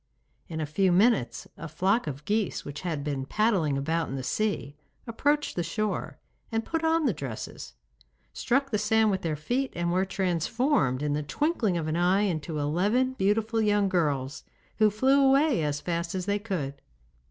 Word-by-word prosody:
In 160 Hz, -1 st, -4 dB
a 155 Hz, -, -1 dB
few 185 Hz, +5 st, +1 dB
minutes 180 Hz, -, +2 dB
a 165 Hz, -, -6 dB
flock 190 Hz, +8 st, +1 dB
of 145 Hz, 0 st, -6 dB
geese 210 Hz, -1 st, -1 dB
which 145 Hz, 0 st, -6 dB
had 160 Hz, -6 st, -3 dB
been 140 Hz, -2 st, -2 dB
paddling 190 Hz, -10 st, +1 dB
about 160 Hz, +4 st, -1 dB
in 135 Hz, -, -4 dB
the 130 Hz, -, -4 dB
sea 200 Hz, -4 st, -2 dB, 0.3 s
approached 290 Hz, +6 st, 0 dB
the 175 Hz, -, 0 dB
shore, 210 Hz, +5 st, -3 dB, 0.3 s
and 225 Hz, 0 st, -1 dB
put 325 Hz, 0 st, -2 dB
on 320 Hz, -1 st, +2 dB
the 245 Hz, -, +2 dB
dresses, 135 Hz, -8 st, -7 dB, 0.6 s
struck 275 Hz, +3 st, 0 dB
the 210 Hz, -, +1 dB
sand 220 Hz, +1 st, +3 dB
with 190 Hz, -1 st, -1 dB
their 160 Hz, -2 st, -1 dB
feet 245 Hz, -, -2 dB
and 170 Hz, 0 st, -1 dB
were 185 Hz, +2 st, +2 dB
transformed 185 Hz, -, 0 dB
in 145 Hz, -1 st, 0 dB
the 150 Hz, -, 0 dB
twinkling 215 Hz, -, 0 dB
of 160 Hz, -2 st, -2 dB
an 155 Hz, +1 st, -1 dB
eye 180 Hz, +3 st, +3 dB
into 165 Hz, -5 st, -2 dB
eleven 200 Hz, -, +1 dB
beautiful 220 Hz, +1 st, +1 dB
young 205 Hz, -2 st, +2 dB
girls, 145 Hz, -7 st, -1 dB, 0.3 s
who 215 Hz, -1 st, +5 dB
flew 265 Hz, +7 st, +3 dB
away 270 Hz, -, +4 dB
as 145 Hz, -1 st, -1 dB
fast 170 Hz, 0 st, -2 dB
as 185 Hz, -1 st, -2 dB
they 205 Hz, 0 st, 0 dB
could. 160 Hz, -10 st, -4 dB
190 Hz, 180 wpm, -27 LUFS, 155-225 Hz, 0.6 s, who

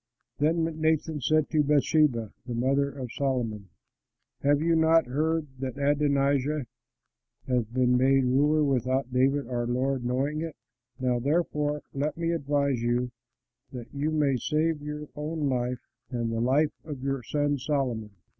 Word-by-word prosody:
Then 160 Hz, +3 st, +2 dB, 0.2 s
Nathan 160 Hz, -1 st, +1 dB
said 155 Hz, +3 st, +2 dB
to 155 Hz, -2 st, +3 dB
Bathsheba 145 Hz, -5 st, +2 dB
the 120 Hz, -, -3 dB
mother 135 Hz, +4 st, +1 dB
of 130 Hz, -4 st, -7 dB
Solomon, 120 Hz, -8 st, -2 dB, 0.7 s
"Have 145 Hz, +1 st, +3 dB
you 165 Hz, +2 st, +2 dB
not 160 Hz, 0 st, +4 dB
heard 155 Hz, +5 st, 0 dB
that 130 Hz, 0 st, -4 dB
Adonijah 140 Hz, 0 st, +1 dB, 0.8 s
has 125 Hz, -3 st, +1 dB
been 125 Hz, +2 st, +2 dB
made 135 Hz, +1 st, +4 dB
ruler 145 Hz, +5 st, +3 dB
without 130 Hz, -1 st, 0 dB
David 135 Hz, +2 st, +2 dB
our 120 Hz, -1 st, -2 dB
lord 130 Hz, +1 st, 0 dB
knowing 135 Hz, +5 st, -1 dB
it? 165 Hz, -1 st, -5 dB, 0.4 s
Now, 125 Hz, -1 st, +1 dB
therefore, 150 Hz, +1 st, 0 dB
let 145 Hz, +3 st, -2 dB
me 165 Hz, 0 st, 0 dB
advise 140 Hz, -5 st, 0 dB
you 120 Hz, +1 st, 0 dB, 0.6 s
that 120 Hz, -2 st, -8 dB
you 145 Hz, +2 st, -1 dB
may 145 Hz, -4 st, +2 dB
save 155 Hz, +3 st, 0 dB
your 150 Hz, 0 st, -6 dB
own 150 Hz, 0 st, -2 dB
life 125 Hz, -1 st, -2 dB, 0.2 s
and 120 Hz, -3 st, -2 dB
the 115 Hz, 0 st, -1 dB
life 140 Hz, +5 st, +2 dB
of 145 Hz, -5 st, -7 dB
your 135 Hz, -1 st, -1 dB
son 145 Hz, +2 st, 0 dB
Solomon. 125 Hz, -6 st, -1 dB
140 Hz, 145 wpm, -27 LUFS, 125-150 Hz, 0.8 s, not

